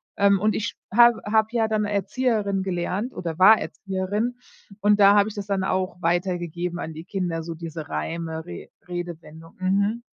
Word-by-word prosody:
ähm 200 -1 +4
und 215 +2 +1
ich 220 +1 -3 0.2
habe 235 0 +6
habe 220 0 +3
ja 230 -2 +1
dann 215 -1 0
Erzieherin 205 0 0
gelernt 190 +6 -2
oder 165 -3 -5
war 210 +4 +7
Erzieherin 205 +5 -3 0.4
und 210 0 +4
da 200 +1 +7
habe 205 0 +4
ich 215 - -7
das 205 -1 -5
dann 195 -2 0
auch 185 -1 -2
weitergegeben 175 0 -1
an 160 - -5
die 160 +1 -8
Kinder, 175 -3 -3
so 165 0 -6
diese 160 -1 -7
Reime, 160 -1 -4
Re 85 - -9 0.2
Redewendung, 165 -2 -8
mhm. 200 +5 +1
190 Hz, 170 wpm, -24 LUFS, 170-210 Hz, 0.4 s, war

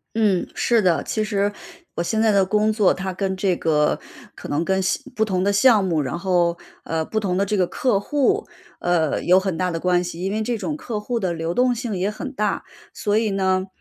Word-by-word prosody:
嗯， 205 -5 +2
是 235 -2 +2
的， 170 -6 +2
其 215 - -1
实 205 -1 0 0.4
我 - - -1
现 215 +6 -1
在 220 -1 +4
的 200 -1 +4
工 210 +3 +1
作， 210 -3 +4
它 190 0 -4
跟 190 0 -2
这 190 -2 +1
个 150 -2 +1 0.4
可 - - -9
能 155 +4 0
跟 190 0 +1
项 185 - +1 0.2
不 220 - +2
同 185 -4 0
的 200 0 +2
项 220 -1 +5
目， 165 -4 +1
然 140 +4 -3
后， 175 -1 +1 0.3
呃， 160 -1 -2
不 220 - -1
同 185 -3 -1
的 200 - +2
这 210 - -1
个 185 -3 +2
客 225 -2 +1
户， 295 - 0 0.3
呃， 165 -4 +1
有 180 +2 +5
很 190 -2 -2
大 180 +2 0
的 165 -1 -3
关 180 0 +2
系， 170 -1 -6
因 195 - -1
为 215 - -1
这 235 +2 -1
种 300 +7 -3
客 230 -7 -4
户 235 +3 -2
的 185 -4 -1
流 165 +1 -3
动 250 +2 +2
性 235 -3 -3
也 190 +3 0
很 265 +6 -6
大。 210 -5 -1 0.3
所 205 0 -1
以 225 -1 0
呢， 190 -1 0
195 Hz, 250 characters per minute, -22 LUFS, 180-215 Hz, 0.4 s, 项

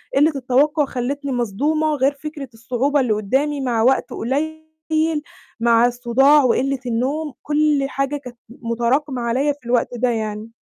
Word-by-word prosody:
قلّة 300 +3 +4
التوقّع 280 +4 +2
خلّتني 275 +2 -3
مصدومة، 295 +7 0
غير 275 +1 +2
فكرة 285 -2 -8
الصعوبة 250 +6 0
اللي 240 -5 +1
قدّامي 270 +8 0
مع 240 -4 0
وقت 260 +3 +2
قليل 315 +6 -3 0.9
مع 235 0 +4
الصداع 250 +4 +4
وقلة 265 +2 +1
النوم 270 +6 -2
كل 295 -2 +1
حاجة 275 +1 -2
كانت 250 -4 -11
م 235 -1 -9
مُتراكمة 250 +3 0
عليّا 265 +5 +1
في 285 -4 -23
الوقت 240 -1 +1
ده 250 +1 +1
يعني. 215 -1 -3
265 Hz, 145 wpm, -20 LUFS, 240-290 Hz, 0.9 s, قلّة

